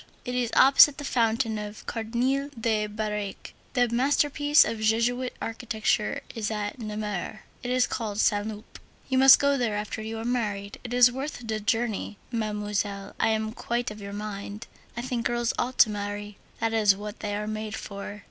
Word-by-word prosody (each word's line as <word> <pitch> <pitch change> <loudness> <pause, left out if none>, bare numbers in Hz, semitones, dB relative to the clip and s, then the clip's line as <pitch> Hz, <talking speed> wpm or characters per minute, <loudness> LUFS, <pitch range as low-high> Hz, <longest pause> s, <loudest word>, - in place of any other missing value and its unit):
It 250 - -3
is 250 -2 0
opposite 275 +2 +7
the 290 - -6
fountain 230 -3 +1
of 210 0 -8
Cardinal 250 +5 -1
de 215 -2 +1
Birague. 210 -1 -4 0.2
The 245 -2 +3
masterpiece 290 +4 +4
of 225 - -3
Jesuit 235 +3 +1
architecture 220 -2 -1
is 215 -2 -2
at 210 +2 -3
Namur. 210 -2 -4 0.2
It 245 - -5
is 255 0 +3
called 215 -3 -3
Saint 205 -1 +2
Loup. 215 -1 -9 0.3
You 260 -1 +2
must 270 0 +9
go 280 -1 +2
there 225 -4 0
after 210 +1 -4
you 220 +1 -5
are 225 - -5
married. 210 -5 -2
It 245 - -7
is 245 0 +6
worth 265 -1 -5
the 220 -1 -1
journey. 215 -1 -1
Mademoiselle, 210 -3 -2
I - - +3
am 220 0 0
quite 240 0 -2
of 210 0 -9
your 200 0 -7
mind, 205 0 -6 0.3
I 235 - -3
think 245 -2 -1
girls 240 -1 0
ought 250 +1 -2
to 220 - +6
marry; 205 0 -5 0.2
that 225 0 0
is 210 -3 +4
what 210 +1 -7
they 205 -1 -3
are 210 +1 -3
made 215 0 -4
for. 200 +1 -7
220 Hz, 180 wpm, -27 LUFS, 210-245 Hz, 0.3 s, must